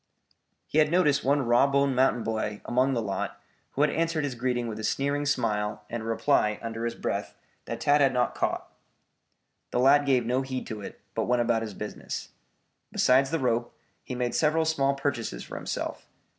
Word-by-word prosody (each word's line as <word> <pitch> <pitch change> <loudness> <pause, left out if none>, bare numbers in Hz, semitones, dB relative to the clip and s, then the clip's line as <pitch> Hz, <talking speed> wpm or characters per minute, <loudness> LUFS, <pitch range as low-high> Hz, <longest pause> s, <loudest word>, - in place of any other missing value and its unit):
He 155 - +1
had 155 -1 +4
noticed 160 -4 +3
one 140 +1 +2
raw 120 +3 +5
boned 140 -1 +2
mountain 125 -2 +3
boy 110 -2 -2
among 130 +2 +2
the 115 - 0
lot 100 -2 -3 0.3
who 140 - -1
had 150 -1 +4
answered 165 -1 0
his 140 -3 -2
greeting 120 0 -1
with 110 -1 -5
a - - -5
sneering 140 +4 0
smile 105 -5 0
and 120 -1 -3
a - - -7
reply 115 -2 +2
under 115 0 -4
his 115 - -2
breath - - -3 0.3
that 115 0 -5
Tad 145 +3 +4
had 135 - +5
not 125 -1 +1
caught. - - -2 1.0
The - - -1
lad 140 +3 +5
gave 130 -3 +3
no 125 +3 +1
heed 130 -1 -4
to 110 -3 -6
it, - - -9
but 110 - -1
went 125 -1 +2
about 115 -1 +1
his 110 -3 -5
business. - - -6 0.6
Besides 135 +1 +4
the 165 - 0
rope, 120 -4 -1 0.3
he 125 - -5
made 125 -1 -1
several 160 +1 +2
small 140 -3 +1
purchases 130 - -3
for - - -9
himself. - - -4
125 Hz, 195 wpm, -27 LUFS, 115-140 Hz, 1.0 s, raw